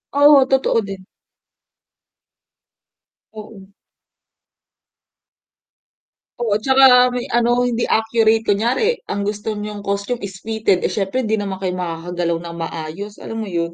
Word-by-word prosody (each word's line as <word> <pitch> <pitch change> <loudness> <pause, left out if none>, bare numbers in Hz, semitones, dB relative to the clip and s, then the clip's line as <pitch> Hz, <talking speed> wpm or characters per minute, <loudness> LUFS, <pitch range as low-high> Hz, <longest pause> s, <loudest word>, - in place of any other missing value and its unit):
Oo, 285 -1 +6
totoo 265 -3 +2
din. 195 -1 -9 2.2
Oo. 210 -3 -12 2.7
Oo, 235 -4 -1
tsaka 260 -1 +6
may 245 - -3
ano 240 0 +1
hindi 240 -1 -1
accurate, 225 0 +2
kunyari 240 - +1
ang 205 - -2
gusto 210 +1 -3
niyong 210 0 -6
costume 200 +4 -3
is 190 -1 -11
fitted, 220 -4 +1
eh, - - 0
siyempre 210 +5 -1
hindi 220 0 0
naman 195 -2 -4
kayo 185 -1 -3
makakagalaw 170 0 -3
ng 170 0 -7
maayos, 165 +5 -6
alam 225 - -7
mo 215 - -5
'yun? 170 -1 -2
210 Hz, 120 wpm, -19 LUFS, 190-240 Hz, 2.7 s, Oo